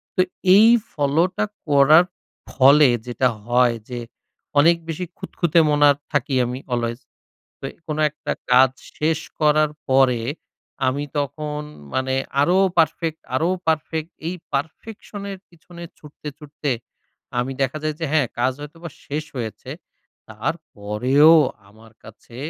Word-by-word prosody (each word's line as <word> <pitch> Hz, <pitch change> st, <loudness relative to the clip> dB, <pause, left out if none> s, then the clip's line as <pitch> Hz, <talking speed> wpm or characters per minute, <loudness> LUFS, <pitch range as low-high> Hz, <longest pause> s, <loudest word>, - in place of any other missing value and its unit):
তো -, -, +4 dB, 0.3 s
এই 215 Hz, +3 st, +7 dB, 0.3 s
ফলোটা 160 Hz, +8 st, +1 dB, 0.2 s
করার 150 Hz, +4 st, +6 dB, 0.5 s
ফলে 140 Hz, +1 st, +6 dB, 0.2 s
যেটা 125 Hz, +1 st, +1 dB, 0.2 s
হয় 120 Hz, 0 st, +3 dB
যে 125 Hz, -1 st, -4 dB, 0.6 s
অনেক 170 Hz, +3 st, +5 dB
বেশি 165 Hz, +3 st, -3 dB
খুঁতখুঁতে 170 Hz, -1 st, 0 dB
মনা 145 Hz, 0 st, +5 dB, 0.2 s
থাকি 140 Hz, -2 st, 0 dB
আমি 125 Hz, +2 st, -4 dB
অলয়েজ। 120 Hz, 0 st, -2 dB, 0.6 s
তো -, -, -12 dB, 0.2 s
কোনো 155 Hz, 0 st, -3 dB
একটা 150 Hz, -, -5 dB, 0.2 s
কাজ 130 Hz, +1 st, +6 dB, 0.3 s
শেষ 155 Hz, +1 st, +1 dB, 0.2 s
করার 150 Hz, 0 st, +3 dB, 0.2 s
পরে, 130 Hz, -3 st, +4 dB, 0.7 s
আমি 140 Hz, +3 st, 0 dB
তখন 150 Hz, +1 st, -3 dB, 0.3 s
মানে 130 Hz, 0 st, 0 dB, 0.3 s
আরো 175 Hz, +6 st, +3 dB, 0.2 s
পারফেক্ট, 160 Hz, 0 st, +1 dB
আরো 160 Hz, +6 st, +1 dB, 0.2 s
পারফেক্ট। 160 Hz, 0 st, -1 dB, 0.2 s
এই 175 Hz, -, -2 dB, 0.2 s
পারফেকশনের 200 Hz, +6 st, -5 dB
পিছনে 170 Hz, 0 st, -14 dB, 0.2 s
ছুটতে 150 Hz, 0 st, -11 dB
ছুটতে 150 Hz, -1 st, -5 dB, 0.7 s
আমি 125 Hz, +2 st, -1 dB
দেখা 135 Hz, +3 st, -1 dB
যায় 155 Hz, 0 st, -1 dB
যে -, -, -1 dB
হ্যাঁ, 145 Hz, -5 st, +3 dB
কাজ 130 Hz, +2 st, +2 dB
হয়তোবা 165 Hz, +4 st, -9 dB, 0.2 s
শেষ 150 Hz, +2 st, -3 dB
হয়েছে। 115 Hz, -4 st, -6 dB, 0.6 s
তারপরেও 125 Hz, +10 st, +2 dB, 0.4 s
আমার 110 Hz, +2 st, -18 dB
কাছে 110 Hz, +2 st, -14 dB
145 Hz, 125 wpm, -21 LUFS, 130-160 Hz, 0.7 s, এই